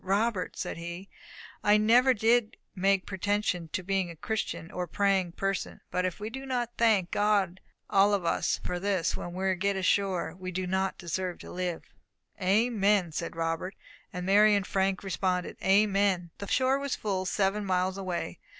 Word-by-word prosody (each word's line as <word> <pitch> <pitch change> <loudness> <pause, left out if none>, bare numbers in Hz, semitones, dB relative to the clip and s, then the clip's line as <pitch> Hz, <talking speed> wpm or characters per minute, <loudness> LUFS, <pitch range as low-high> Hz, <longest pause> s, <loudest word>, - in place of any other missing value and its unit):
"Robert," 200 +1 0
said - - -4
he, 175 +3 -7 0.5
"I 210 0 +5
never 245 +5 +5
did 225 +1 +2 0.2
make 195 0 +2
pretension 195 -3 -1
to 185 - -2
being 190 -1 0
a 170 - -8
Christian, 190 -2 -4
or 180 - -3
a - - -20
praying 195 -1 +1
person, 195 +1 -3
but 180 0 0
if 185 - -3
we 215 +2 -5
do 265 +2 -6
not 245 -3 -2
thank 215 -6 +3
God 200 -3 +1 0.3
all 200 +1 +4
of 190 -4 -3
us - - +1
for 180 0 -3
this 190 -3 0
when 175 - -6
we 190 0 +1
get 200 +2 0
ashore, 190 -2 +1
we 185 0 -6
do 185 +1 -2
not 190 +1 -1
deserve 180 +1 -3
to - - -10
live." 180 -2 -3 0.6
"Amen!" 200 -2 +2
said 165 +2 -4
Robert; 165 +3 -2 0.4
and 180 -3 -5
Mary 205 +2 +5
and 200 -2 0
Frank 195 -1 0
responded, 185 -1 -1
"Amen!" 195 -3 +3
The 200 - -6
shore 265 +4 +2
was 280 -2 -2
full 190 -3 -2
seven 200 +1 0
miles 185 -1 0
away. 180 - -4
195 Hz, 175 wpm, -29 LUFS, 180-205 Hz, 0.6 s, I